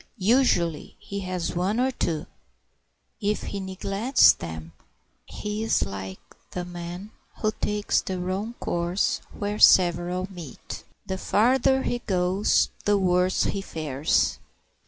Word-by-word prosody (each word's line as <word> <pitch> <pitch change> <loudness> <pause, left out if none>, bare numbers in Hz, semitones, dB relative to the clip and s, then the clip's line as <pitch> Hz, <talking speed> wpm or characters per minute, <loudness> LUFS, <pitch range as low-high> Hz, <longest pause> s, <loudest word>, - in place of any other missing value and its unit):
Usually 190 - +2
he 200 - -6
has 185 -3 -3
one 190 +6 0
or 260 +1 +2
two; 165 -10 -2 1.0
if 210 0 0
he 200 - -4
neglects 195 +6 +3
them 80 -1 -8 0.5
he 210 +1 -4
is 225 - +2
like 95 -1 -6 0.3
the 180 -1 -4
man 175 +3 -7 0.3
who 215 - +3
takes 210 0 +1
the 185 -1 -4
wrong 195 +6 -3
course 175 +3 0
where 205 +1 -4
several 180 +1 +5
meet. 170 -7 -9 0.2
The 190 -1 -4
farther 260 +6 +3
he 240 - -1
goes 190 -2 +2 0.2
the 205 0 +4
worse 180 -1 +2
he 195 - -1
fares. 155 -5 0
185 Hz, 125 wpm, -25 LUFS, 175-210 Hz, 1.0 s, several